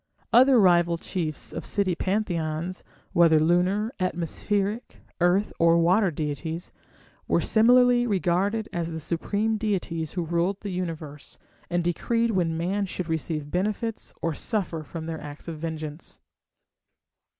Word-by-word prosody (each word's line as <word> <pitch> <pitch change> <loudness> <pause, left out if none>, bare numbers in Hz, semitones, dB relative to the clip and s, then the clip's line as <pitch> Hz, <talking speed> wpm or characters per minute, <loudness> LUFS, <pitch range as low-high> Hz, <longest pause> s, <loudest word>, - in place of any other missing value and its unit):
Other 255 0 +7
rival 175 -3 +4
chiefs 165 -3 -4
of - - -5
city 200 -3 0
pantheons, 175 -3 -2 0.3
whether 165 -2 +5
lunar, 180 +7 +2
atmospheric, 195 +5 -2 0.2
earth, 180 +4 +2
or 165 0 +5
water 185 +4 +4
deities, 160 +2 -4 0.6
were - - +3
similarly 245 +2 +4
regarded 200 +2 0
as 170 -1 -2
the 160 - -4
supreme 205 +7 -1
deities 180 -7 -2
who 175 -3 -2
ruled 175 +4 0
the 205 - -4
Universe, 160 -5 -6 0.3
and 175 -1 0
decreed 230 +7 0
when 170 -5 0
man 195 +4 -1
should 180 -2 -5
receive 155 -2 -3
benefits 210 +4 -2
or 165 - 0
suffer 180 -2 -2
from 160 +1 -7
their 160 -1 -5
acts 145 +2 -9
of 160 -2 -6
vengeance. 155 -1 -6
175 Hz, 130 wpm, -26 LUFS, 165-205 Hz, 0.6 s, Other